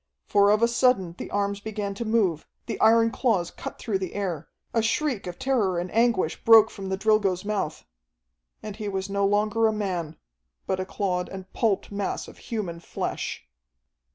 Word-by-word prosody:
For 200 0 +4
of 210 +2 +3
a - - +6
sudden 235 -7 +2
the - - -6
arms 200 0 -1
began 205 -1 -4
to 230 +4 -5
move, 205 -8 +1 0.2
the - - -4
iron 230 +1 +5
claws 200 -10 0
cut - - -8
through 205 -4 -2
the 185 -2 -5
air 180 -7 -3 0.3
a 230 - +3
shriek 230 -1 0
of 175 - -6
terror 220 -9 +1
and 175 +1 -3
anguish 230 -8 +1
broke 225 -1 +7
from 195 -2 -7
the 190 - -1
Drilgo's 205 -3 +2
mouth... 205 -7 -2 0.8
and 210 -1 -7
he 210 -2 -4
was 195 0 -3
no 200 0 +2
longer 215 +2 +2
a - - +2
man, 180 -7 -3 0.5
but 190 - -1
a 185 - -2
clawed 185 -2 -2
and 190 -1 -9
pulped 215 -4 0
mass 200 -1 -3
of - - -13
human 190 -8 -4
flesh! 65 - -4
200 Hz, 180 wpm, -26 LUFS, 185-220 Hz, 0.8 s, broke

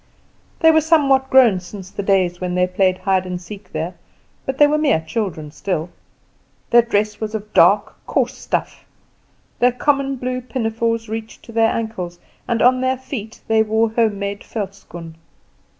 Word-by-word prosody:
They 325 -1 +7
were 315 0 +4
somewhat 275 -4 +3
grown 245 -8 +6
since 185 +1 -10
the - - -4
days 185 -3 +1
when 180 -1 -2
they 180 0 +3
played 185 0 +1
hide 190 -1 0
and 180 -1 -4
seek 195 +1 -11
there, 160 +3 -3 0.5
but 265 0 -2
they 295 - +7
were 300 +1 +2
mere 295 - +3
children 160 -8 -3
still. 175 0 -3 0.8
Their 240 - +8
dress 210 -2 -1
was 220 0 -3
of 210 0 -6
dark, - - +4
coarse - - 0
stuff; - - -3 0.8
their 245 +1 +4
common 275 +1 0
blue 255 0 -3
pinafores 230 -2 -2
reached 220 0 -6
to - - -12
their 225 0 +3
ankles, 185 -6 -4 0.3
and 235 -1 +1
on 255 +1 +4
their 260 0 +1
feet 255 -4 -7
they 220 0 +4
wore 220 +1 +1
home 220 -3 +1
made 200 0 -4
velschoen. 180 -6 -7
220 Hz, 165 wpm, -20 LUFS, 185-250 Hz, 0.8 s, Their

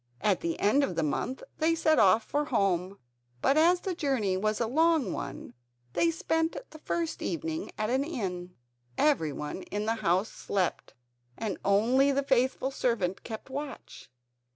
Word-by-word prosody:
At 205 -3 +2
the 165 -1 -2
end 245 +8 +3
of 275 - -1
the 165 - 0
month 245 - -2 0.2
they 325 +1 +3
set 315 -1 +3
off 195 +4 +5
for 295 +1 -1
home, 195 - 0 0.4
but 270 - +3
as 345 +3 +4
the 380 - -2
journey 265 - 0
was 215 +3 0
a 235 - +1
long 320 +4 +2
one - - -6 0.4
they 335 - +3
spent 325 0 0
the 315 - -11
first 330 +1 -2
evening 325 +1 -3
at 215 +2 -1
an 265 +2 +2
inn. 185 - -4 0.4
Everyone 160 - 0
in 205 +2 -4
the 225 - +1
house 185 +2 +2
slept, 190 -3 -2 0.4
and 210 -5 -3
only 240 +8 +4
the 280 0 +1
faithful 260 0 +1
servant 225 -9 -1
kept 225 +3 -8
watch. 285 - -7
250 Hz, 160 wpm, -29 LUFS, 195-305 Hz, 0.4 s, off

